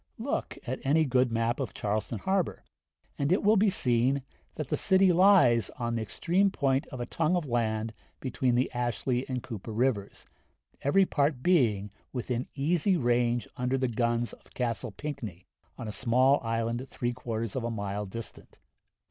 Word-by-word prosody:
Look 240 +5 -3
at 130 +1 -3
any 155 +4 +3
good 125 -2 +2
map 115 +2 0
of 125 -8 -4
Charleston 110 +2 -2
harbor, 190 - -1 0.6
and 140 +2 +1
it 185 - +2
will 210 +2 +5
be 210 0 +4
seen 130 -3 +2 0.3
that 155 -4 -5
the - - +1
city 190 -2 +4
lies 170 - +5
on 120 -1 -2
the 115 - -1
extreme 175 - +1
point 135 -6 0
of 130 - -8
a 120 - -2
tongue 165 +7 0
of 175 -3 -1
land 110 -3 -1 0.3
between 130 -1 0
the 125 +2 +1
Ashley 120 +1 -1
and 125 -2 -3
Cooper 110 0 -7
rivers, 110 -3 -1 0.6
every 190 +8 +4
part 140 -5 0
being 110 - +2 0.2
within 125 -1 -2
easy 170 +6 +2
range 120 -2 +1
under 125 +1 0
the 130 0 +1
guns 120 0 0
of - - -18
Castle 120 0 -2
Pinckney, 110 - -6 0.3
on 115 - -6
a - - -3
small 130 +6 +3
island, 115 +3 -2
three 120 0 -2
quarters 115 -3 -4
of 130 - -2
a 120 - -1
mile 100 -2 -3
distant. 115 +4 -8
125 Hz, 170 wpm, -29 LUFS, 115-140 Hz, 0.6 s, will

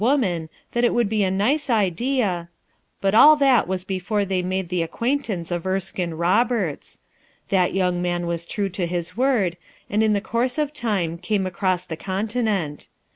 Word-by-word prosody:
a - - -1
"Oman 195 - +1 0.2
that 240 - 0
it 240 - +3
would 240 -2 +2
bo 220 - 0
a 200 -3 +2
race 250 +11 +1
idi 235 +4 +1
a 175 -5 -2 0.3
— - - -45
But 195 0 +1
all 300 +8 +8
that 270 - +3
was 185 0 -2
before 195 +2 -1
they 190 -1 0
made 185 0 -2
the 180 -1 0
ac 165 - -1
quaintance 230 -9 -2
of 175 -1 -1
Erskme 185 -2 -2
Roberts 185 - 0 0.5
Th*t 185 -1 +2
man 175 0 -1
was 170 0 -3
true 200 -2 -2
to 180 -1 -2
his 175 +1 -3
word, 230 -9 +1 0.3
and 210 +2 +2
in 220 -1 +3
the 205 - +2
course 235 +5 -1
of 300 -1 -1
time 195 - -1
came 195 +1 -1
across 185 0 -1
the 160 -3 -6
continent. 200 -4 -2
190 Hz, 185 wpm, -23 LUFS, 175-230 Hz, 0.5 s, all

